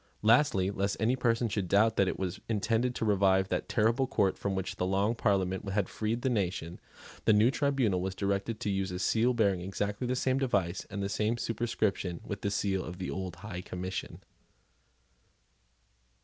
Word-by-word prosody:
Lastly, 110 -4 +4
lest 100 0 -1
any 115 +3 +2
person 120 -2 +1
should 100 -3 -2
doubt 110 +4 +4
that 100 - +3
it - - -2
was 95 -1 -3
intended 115 +3 0
to - - -1
revive 95 -2 +3
that - - -2
terrible 115 +4 +2
court 95 -5 +1
from 100 -1 -2
which 95 0 -3
the 90 - 0
Long 100 +4 +1
Parliament 95 -4 0
had 100 -1 0
freed 110 +2 -2
the 130 - +2
nation, 90 -5 -2 0.5
the 110 - +5
new 110 +4 +5
tribunal 135 -10 +1
was 95 +1 -3
directed 100 +3 -1
to 105 - -1
use 95 0 -1
a 90 - -4
seal 115 +6 +2
bearing 100 -6 +2
exactly 100 +5 -3
the 125 - 0
same 130 +1 +1
device 100 -9 0
and 100 0 -4
the - - 0
same 105 +4 0
superscription 110 -6 -1
with 100 -1 -6
the 100 - 0
seal 100 -2 0
of 90 +2 -7
the 90 - -4
old 95 -2 -4
High 90 0 -7
Commission. 90 +1 -6
100 Hz, 185 wpm, -30 LUFS, 95-115 Hz, 0.5 s, the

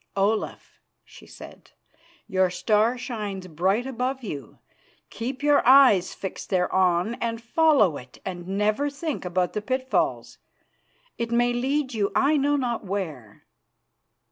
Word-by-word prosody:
"Olaf," 205 +2 -1 0.2
she - - -16
said, - - -13 0.6
"your 190 -1 +1
star 215 +6 +1
shines 210 -6 -5
bright 185 +8 0
above 260 +1 -3
you. 145 - -7 0.5
Keep 255 +5 -5
your 290 -1 +4
eyes 250 -9 +6
fixed 190 - -7
thereon 185 +1 +1
and 230 -1 -2
follow 235 - +3
it, 125 0 -13
and 175 -2 -6
never 210 +8 0
think 285 - -5
about 180 0 -1
the 210 - -2
pitfalls. 260 +3 -1 0.8
It 235 0 -2
may 240 +1 +2
lead 265 +2 -1
you 205 -3 0
I 285 +3 +3
know 290 0 +2
not 245 -5 -2
where." 160 - -6
220 Hz, 130 wpm, -25 LUFS, 185-260 Hz, 0.8 s, eyes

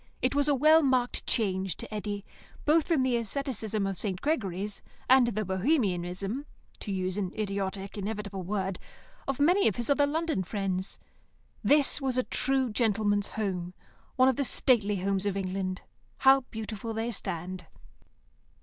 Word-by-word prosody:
It 255 - +1
was 285 0 +2
a 290 - +4
well 310 +4 +6
marked 255 -4 +1
change 190 -5 0
to - - -8
Eddy, 205 -1 -4 0.4
both 310 +1 +4
from 315 -7 +2
the 255 -2 +2
asceticism 225 -3 -2
of 195 -1 -3
St. 190 -4 -2
Gregory's, 205 - -2 0.3
and 260 -1 +6
the 215 -2 -1
bohemianism 195 - 0 0.3
(to 205 - -5
use 185 0 -1
an 185 -3 -2
idiotic, 200 -1 -3
inevitable 200 -1 -4
word) 190 0 -2 0.5
of 275 -1 -2
many 355 +7 +4
of 210 - +1
his 240 +3 -1
other 285 0 +4
London 320 - 0
friends. 190 0 -2 0.7
This 290 0 +4
was 260 -2 0
a 255 - +3
true 265 -2 0
gentleman's 210 -2 +1
home, 185 -4 -3 0.4
one 255 0 +5
of 265 - +2
the 280 - +1
stately 225 -6 +2
homes 195 +1 0
of 200 -1 -1
England, 185 -1 -3 0.3
how 270 0 +6
beautiful 220 0 -5
they 225 +2 -1
stand. 180 -3 -4
210 Hz, 155 wpm, -29 LUFS, 195-260 Hz, 0.7 s, well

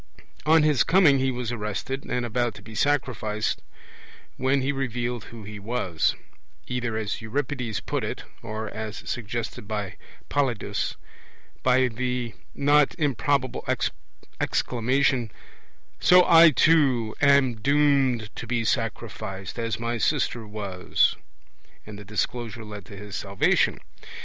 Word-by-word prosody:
On 160 0 +6
his 150 -4 +4
coming 165 -7 +5
he 130 0 +1
was 125 -2 -3
arrested, 120 +4 -4
and 125 -1 -1
about 120 -1 -1
to 100 - -12
be 110 +1 -11
sacrificed, 115 -5 0 0.7
when 130 +1 +1
he 140 - +1
revealed 125 -4 -3
who 115 -2 -10
he 105 +1 -8
was 100 -6 0 0.5
either 120 -3 -2
as 110 +1 -3
Euripides 125 -1 -2
puts - - -2
it, - - -5 0.2
or 110 +1 -5
(as 110 -1 -6
suggested 115 -2 -4
by 105 -3 -4 0.3
Polyidus) 135 -6 -1 0.7
by 130 0 +4
the 125 0 -3 0.2
not 145 0 +4
improbable 140 -3 0 0.8
exclamation, 125 -1 +1 0.7
'So 180 0 +7
I 165 -1 +8
too 135 -6 +3
am 140 -3 +5
doomed 135 -3 +2
to 115 - -6
be 120 -1 0
sacrificed, 110 -3 -3
as 115 -1 -2
my 115 0 -2
sister 120 -4 0
was'; 100 -4 0 0.7
and 105 -1 -9
the - - -9
disclosure 110 +2 -3
led 105 -3 -8
to 100 - -11
his 105 +1 -8
salvation. 100 -1 +2
120 Hz, 125 wpm, -25 LUFS, 110-135 Hz, 0.8 s, I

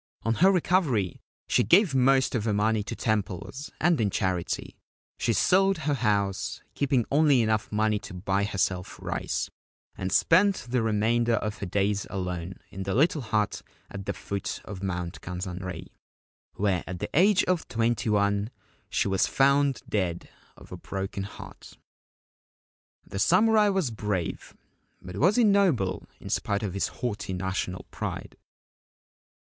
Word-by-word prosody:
On 115 - +1
her 185 +10 +5
recovery 160 - +1 0.3
she - - +3
gave 180 -3 +5
most 130 0 +3
of 115 -3 -1
her 110 - +1
money 110 +1 +2
to 100 - -5
temples, 110 - -2
and 165 -5 +3
in 105 - +2
charity; 90 -2 -2 0.4
she - - +1
sold 195 - +3
her 150 -1 -1
house, 100 -6 0
keeping 135 -5 +1
only 145 -4 +4
enough 110 -1 0
money 105 0 +1
to 90 - -9
buy 95 +2 0
herself 95 -2 -2
rice, - - -3 0.4
and 95 0 -4
spent 185 - +4
the 125 0 +1
remainder 115 +2 +2
of 105 -1 -3
her 100 - -4
days 100 +2 0
alone 90 -1 -4 0.2
in 95 - -7
the 95 +1 -2
little 150 +3 +3
hut 110 -3 -1 0.3
at 100 0 -7
the - - 0
foot 100 -1 -4
of 95 -2 -7
Mount 90 -3 -4
Kenzanrei, 90 0 -5 0.7
where 95 -3 0
at 90 - -5
the - - -4
age 190 +5 +5
of 180 -2 0
twenty 115 0 0
one 100 0 +1 0.4
she - - 0
was 95 -1 +2
found 140 -1 +2
dead 90 -5 -2 0.3
of - - -15
a - - -6
broken 95 0 -4
heart. - - -11 1.3
The 95 - -6
samurai 210 - +4
was 190 -10 0
brave; 105 -5 -3 0.4
but 90 +1 -9
was 180 - +4
he 245 - +4
noble 180 - +2
in - - -9
spite 100 +1 -1
of 100 -4 -3
his 100 - 0
haughty 105 -5 -4
national 95 0 -3
pride - - -5
105 Hz, 150 wpm, -27 LUFS, 95-140 Hz, 1.3 s, her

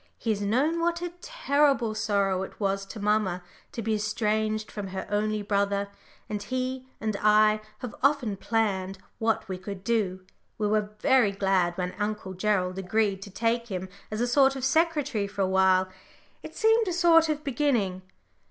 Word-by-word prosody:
He 225 - -1
has 205 -1 -1
known 265 +11 +1
what 340 +1 0
a 350 -1 -4
terrible 285 - +1
sorrow 200 -3 0
it 190 - -7
was 195 -1 -1
to 215 - -8
mamma 205 -3 0 0.3
to 230 - -5
be 220 +1 0
estranged 215 0 -1
from 205 -2 -5
her 190 0 -5
only 210 0 0
brother, 200 0 0 0.4
and 210 -1 -4
he 255 +3 -3
and 215 -1 -2
I 215 0 +4 0.2
have 235 - -7
often 275 -7 +2
planned 195 -3 -1 0.2
what 225 0 0
we 185 -1 -5
could 190 0 -7
do. 195 -5 -1 0.3
We 210 - 0
were 210 0 +1
very 250 -6 +4
glad 190 -3 +1
when 180 0 -2
Uncle 210 -2 -3
Gerald 185 -1 0
agreed 195 +1 0
to 200 - -8
take 230 +4 -1
him 190 -3 -5 0.2
as 215 +1 -3
a 245 - +1
sort 270 +2 +4
of 265 -1 -3
secretary 290 -8 +1
for 200 0 -2
a - - +1
while 190 0 +3 0.5
it - - -10
seemed 445 0 +3
a 360 - -1
sort 330 -2 +5
of 300 -1 -2
beginning." 240 -10 0
215 Hz, 175 wpm, -27 LUFS, 195-255 Hz, 0.5 s, sort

